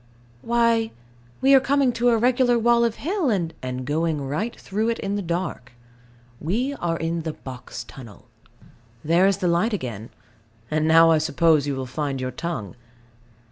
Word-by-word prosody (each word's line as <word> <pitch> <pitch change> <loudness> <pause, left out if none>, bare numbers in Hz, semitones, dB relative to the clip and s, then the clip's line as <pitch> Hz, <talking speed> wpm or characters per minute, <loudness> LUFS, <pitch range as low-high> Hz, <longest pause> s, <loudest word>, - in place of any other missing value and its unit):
Why, 230 - +2 0.5
we 270 +1 +5
are 270 - +8
coming 275 -1 +2
to 240 +1 +1
a 230 - +3
regular 245 +1 +3
wall 235 +1 +3
of 230 -1 0
hill, 350 -2 -1
and 175 -7 -1
And 130 0 -4
going 155 +2 0
right 150 - -3
through 215 +4 -2
it 230 - -1
in 200 +1 -3
the 205 - -2
dark. 170 -8 -4 0.7
We 235 - -1
are 170 -10 -2
in 165 +1 -2
the 160 -1 -4
Box 130 -4 -9
Tunnel. 115 -7 -13 0.8
There 170 +5 +4
is 195 -1 +2
the 185 -3 -1
light 175 +7 +1
again: 120 - -5 0.6
and 155 0 +1
now 165 +1 +6
I 160 - +4
suppose 155 -1 +2
you 140 - -1
will 130 0 -4
find 140 +1 -3
your 130 0 -3
tongue. 160 - -5
170 Hz, 175 wpm, -23 LUFS, 150-230 Hz, 0.8 s, are